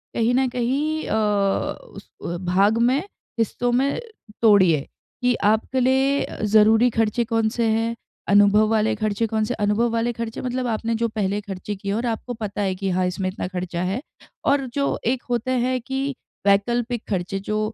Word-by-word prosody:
कहीं 230 +1 +2
न 265 0 +3
कहीं 275 +6 -1
अ, - - 0
उस 210 - -1 0.4
भाग 195 +5 +3
में, 245 +4 +3 0.4
हिस्सों 240 +2 0
में 270 - +1 0.4
तोड़िए। 185 -10 +4 0.4
कि 245 - +4
आपके 220 +5 +2
लिए 265 +2 +2 0.3
ज़रूरी 220 +3 +5
खर्चे 225 +1 +1
कौन 225 -1 +1
से 235 - 0
हैं, 225 +1 0 0.3
अनुभव 205 +1 +5
वाले 220 -1 +2
खर्चे 215 +1 -1
कौन 220 0 0
से 245 - -2
हैं? - - -7
अनुभव 215 +4 +2
वाले 230 +1 0
खर्चे 230 -1 -5
मतलब 255 0 -2
आपने 230 0 -1
जो 230 +1 0
पहले 205 -2 -2
खर्चे 200 0 -6
किए 200 0 -4
हैं 205 - 0
और 235 - -2
आपको 235 +1 -3
पता 210 -3 -4
है 190 -2 0
कि 195 +1 -3
हाँ, 185 0 +1
इसमें 185 +1 -2
इतना 185 -1 -4
खर्चा 180 -2 -4
है। 195 +7 -2 0.4
और 280 -1 +2
जो 280 -1 0
एक 245 +2 0
होते 245 +1 -1
है 255 0 0
कि 270 +2 -3 0.3
वैकल्पिक 235 +4 +1
खर्चे 190 0 -2
जो 215 +2 -2
225 Hz, 180 wpm, -23 LUFS, 205-245 Hz, 0.4 s, ज़रूरी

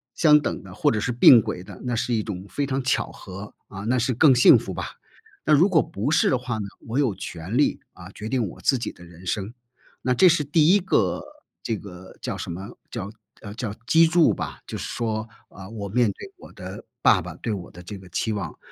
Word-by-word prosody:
相 150 -3 +6
等 150 - -4
的 95 -2 -11
或 - - +2
者 110 - 0
是 125 - -1
并 120 0 +8
轨 90 - -5
的， 95 0 -12
那 125 -2 -2
是 120 +2 -1
一 110 -2 +1
种 95 -3 -6
非 145 - -2
常 135 0 -1
巧 115 -3 0
合， 95 +2 -10
啊， 100 0 -8
那 120 +4 +1
是 125 +2 0
更 135 +4 +6
幸 125 - +7
福 - - -5
吧。 - - -5 0.5
那 155 - +4
如 155 +6 +6
果 165 -5 +4
不 105 +8 -3
是 160 - +4
的 130 - +2
话 125 -2 -4
呢， 105 -2 -4 0.2
我 115 - -3
有 135 -7 +2
权 90 +8 -5
利， 145 - +2
啊， - - -12
决 110 - -7
定 125 -4 0
我 - - -11
自 135 - +3
己 115 - -4
的 90 - -16
人 85 +1 -15
生。 100 +4 -3 0.5
那 125 - +1
这 180 +9 +6
是 160 -3 +2
第 150 +2 +3
1 - - +4
个， 190 0 +1 0.4
这 115 -2 -2
个 95 -2 -12
叫 - - -4
什 - - -6
么， 95 +4 -7 0.2
叫 100 -4 -5
叫， 110 - -24 0.2
呃， 100 -2 -8
叫 110 -2 -4
基 165 +4 +5
柱 165 0 +4
吧。 - - -6
就 - - -6
是 - - -5
说， 110 -2 -3 0.2
啊， 95 0 -11
我 105 -3 -6
面 120 +2 +2
对 - - -11
我 - - -14
的 - - -9 0.2
爸 - - +5
爸 - - -8
对 115 - -4
我 95 -4 -6
的 90 - -12
这 100 +3 -8
个 95 -1 -14
期 110 +6 -1
望。 100 -4 -5
115 Hz, 255 characters per minute, -24 LUFS, 100-135 Hz, 0.5 s, 并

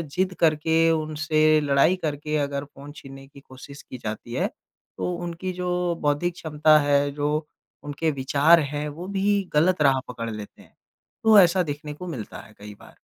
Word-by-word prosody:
ज़िद 185 0 0
करके, 160 +1 +3
उनसे 155 0 +2
लड़ाई 145 +5 +3
करके 150 -3 -4
अगर 140 -1 -2
फ़ोन 140 0 -13
छीनने 135 -1 -12
की 140 - -16
कोशिश 135 +2 -13
की 130 - -10
जाती 110 +1 -7
है, 130 - 0 0.5
तो 180 - -2
उनकी 175 +1 -5
जो 180 -1 -2
बौद्धिक 150 +4 0
क्षमता 155 -2 +3
है, 145 -1 +1
जो 150 +2 -2 0.4
उनके 150 +2 -2
विचार 140 +5 +3
हैं, 150 0 -3
वो 165 +5 -8
भी 200 0 0
गलत 165 +2 +2
राह 135 -2 +4
पकड़ 115 -2 -6
लेते 105 -1 -9
हैं। - - -22 0.5
तो 220 -2 +7
ऐसा 180 0 +4
देखने 150 -1 -6
को 180 +5 -9
मिलता 125 -11 -7
है 105 - -17
कई 105 0 -10
बार। - - -17
150 Hz, 175 wpm, -24 LUFS, 140-170 Hz, 0.5 s, तो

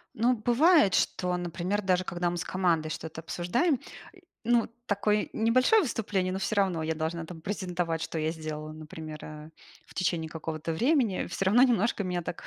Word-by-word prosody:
Ну 240 +3 +3
бывает, 245 - +4
что, 180 -1 +1
например, 175 +4 -2
даже 185 -1 +1
когда 175 -1 -1
мы 175 - -3
с 170 - -3
командой 175 -4 +1
что-то 160 0 -6
обсуждаем, 180 - 0 0.6
ну, 235 0 +3 0.2
такое 210 0 +1
небольшое 255 - +4
выступление, 200 - -1
но 190 - -2
всё 210 +2 -1
равно 185 -5 +1
я 160 0 0
должна 160 +1 -3
там 160 -1 -10
презентовать, 175 -3 -2
что 165 - -3
я 155 +1 0
сделала, 155 -1 -6
например, 155 0 -8
э, 155 0 -9 0.4
в - - -16
течение 165 -3 -1
какого-то 160 0 -4
времени, 240 - +2
всё 190 +2 -3
равно 230 +6 +6
немножко 230 -4 +2
меня 180 -2 -2
так 165 - -6
180 Hz, 175 wpm, -28 LUFS, 160-210 Hz, 0.6 s, равно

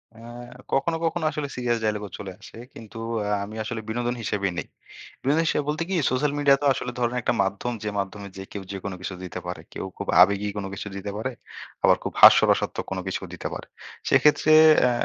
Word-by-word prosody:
অ্যা 115 +1 -12 0.5
কখনো, 165 +5 +1
কখনো 165 0 -1
আসলে 150 -2 -3
সিরিয়াস 120 -2 0
ডায়ালগও 105 -1 -1
চলে 100 -2 -6
আসে। - - -12 0.2
কিন্তু 115 0 -11 0.3
আ - - -2 0.2
আমি 105 +2 -10
আসলে 110 0 -4
বিনোদন 120 +2 -1
হিসেবেই 100 -3 -1
নেই। - - -4 0.5
বিনোদন 150 +5 +2
হিসেবে 150 - +1
বলতে 150 +2 -1
কি 195 - -1 0.2
সোশ্যাল 140 +3 +1
মিডিয়া 140 -1 +5
তো - - +1
আসলে 125 - -4
ধরেন 120 0 0
একটা 120 - +1
মাধ্যম, 100 +5 -2
যে, 105 - -2
মাধ্যমে 100 +1 -4
যে, 95 - -6
কেউ 100 - -5
যেকোনো 95 -1 -5
কিছু 95 - -4
দিতে 90 - -6
পারে। 90 -2 -5
কেউ - - -5
খুব - - -5
আবেগী 100 +2 +3
কোনো 100 -1 -3
কিছু 105 - -6
দিতে 100 +1 -5
পারে। 110 +5 -2 0.5
আবার - - +6
খুব - - -3
হাস্যরসাত্মক - - +6 0.2
কিছুও 95 - -3
দিতে - - -6
পারে। - - -8 0.4
সেক্ষেত্রে 150 +1 +4 0.3
অ্যা 125 - +4
110 Hz, 195 wpm, -25 LUFS, 100-135 Hz, 0.5 s, আবার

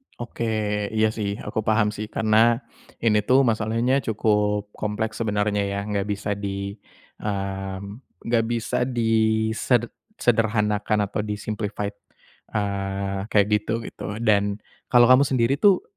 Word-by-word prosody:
Oke. 120 0 -6 0.5
Iya 110 0 +4
sih, 100 -2 -3
aku 105 +1 -2
paham 110 -1 +3
sih. 110 +1 -5
Karena 110 +3 +3 0.4
ini 110 -2 +4
tuh 135 +2 +5
masalahnya 115 +3 +1
cukup 105 -1 +1
kompleks 110 +1 -3
sebenarnya 105 -2 0
ya, 100 0 -3
nggak 100 -1 -2
bisa 105 0 -3
di, 100 -1 -4 0.5
mmm, 100 +1 -4 0.2
enggak 115 -1 +2
bisa 120 -1 -1
diseder 110 0 +1 0.3
sederhanakan 105 -2 +1
atau 105 +2 -3
di-simplified, 105 -1 -4 0.6
eee, 100 -1 -2
kayak 105 -2 +3
gitu 105 +1 0
gitu. 105 - -6
Dan 100 -3 +2 0.3
kalau 120 -1 +7
kamu 130 +2 +7
sendiri 125 -1 +2
tuh, 200 -3 +5
105 Hz, 125 wpm, -24 LUFS, 100-115 Hz, 0.6 s, kalau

